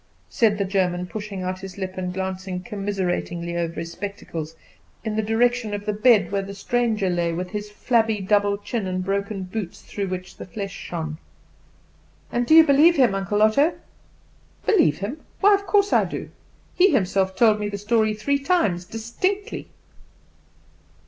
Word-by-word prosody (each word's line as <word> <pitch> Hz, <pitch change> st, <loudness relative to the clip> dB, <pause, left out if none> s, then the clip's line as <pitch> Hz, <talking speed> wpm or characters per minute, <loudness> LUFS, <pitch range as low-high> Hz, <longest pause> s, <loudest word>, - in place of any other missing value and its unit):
said 215 Hz, -3 st, +2 dB
the 200 Hz, -, 0 dB
German, 180 Hz, -2 st, 0 dB
pushing 200 Hz, 0 st, -6 dB
out 185 Hz, 0 st, -3 dB
his 190 Hz, -1 st, -9 dB
lip 190 Hz, -1 st, -4 dB
and 180 Hz, -1 st, -3 dB
glancing 190 Hz, 0 st, -4 dB
commiseratingly 185 Hz, -4 st, -3 dB
over 170 Hz, -1 st, -2 dB
his 165 Hz, 0 st, -6 dB
spectacles 170 Hz, -5 st, -6 dB, 0.5 s
in 220 Hz, -2 st, -2 dB
the 220 Hz, -, +1 dB
direction 225 Hz, 0 st, +1 dB
of 205 Hz, 0 st, -6 dB
the 210 Hz, -, 0 dB
bed 215 Hz, 0 st, +4 dB
where 200 Hz, -1 st, 0 dB
the 200 Hz, 0 st, -8 dB
stranger 225 Hz, -1 st, 0 dB
lay, 175 Hz, -2 st, 0 dB
with 180 Hz, +2 st, -4 dB
his 210 Hz, 0 st, -4 dB
flabby 225 Hz, 0 st, +1 dB
double 205 Hz, +1 st, +2 dB
chin, 210 Hz, 0 st, -3 dB
and 185 Hz, 0 st, -2 dB
broken 200 Hz, 0 st, -2 dB
boots 185 Hz, -1 st, -6 dB
through 200 Hz, -1 st, -4 dB
which 185 Hz, 0 st, -6 dB
the -, -, -7 dB
flesh 195 Hz, +2 st, -5 dB
shone. 160 Hz, -4 st, -5 dB, 1.1 s
"And 240 Hz, 0 st, 0 dB
do 315 Hz, -, +6 dB
you 325 Hz, -, +10 dB
believe 305 Hz, +5 st, +6 dB
him, 255 Hz, -8 st, +4 dB
Uncle 195 Hz, +2 st, +1 dB
Otto?" 280 Hz, +10 st, +3 dB, 0.9 s
"Believe 335 Hz, -, +4 dB
him? 230 Hz, -, -5 dB, 0.2 s
why 410 Hz, +1 st, +6 dB
of 400 Hz, 0 st, 0 dB
course 405 Hz, +1 st, +3 dB
I -, -, +4 dB
do. -, -, -6 dB, 0.4 s
He 370 Hz, +2 st, +5 dB
himself 190 Hz, -, +1 dB
told 215 Hz, -1 st, +4 dB
me 210 Hz, 0 st, -2 dB
the 200 Hz, -, -4 dB
story 215 Hz, +1 st, +1 dB
three 280 Hz, +7 st, 0 dB
times 275 Hz, -, +1 dB
distinctly." 235 Hz, -, -3 dB
205 Hz, 170 wpm, -23 LUFS, 185-230 Hz, 1.1 s, you